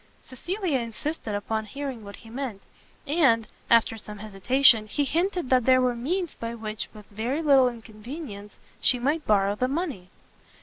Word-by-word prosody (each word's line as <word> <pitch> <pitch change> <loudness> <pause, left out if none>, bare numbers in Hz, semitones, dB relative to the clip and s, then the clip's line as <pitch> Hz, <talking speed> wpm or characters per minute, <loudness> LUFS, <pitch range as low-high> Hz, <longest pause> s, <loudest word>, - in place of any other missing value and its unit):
Cecilia 345 - -2
insisted 230 0 -4
upon 220 +2 -2
hearing 270 -2 -5
what 200 0 -9
he 225 - -15
meant, 240 -6 -5 0.4
and, 270 -8 +3 0.2
after 225 -1 +4
some 210 0 -8
hesitation, 215 +3 +4
he 290 +7 0
hinted 345 0 -1
that 255 -3 +4
there 255 0 +6
were 250 -1 +2
means 335 +8 -2
by 230 0 -5
which, 215 -1 -5
with 210 -2 -13
very 240 +9 -2
little 270 -4 +6
inconvenience, 220 -1 -9 0.2
she 250 - +3
might 290 +6 -1
borrow 200 -1 +3
the 250 +5 0
money. 275 - -3
245 Hz, 160 wpm, -26 LUFS, 215-280 Hz, 0.4 s, there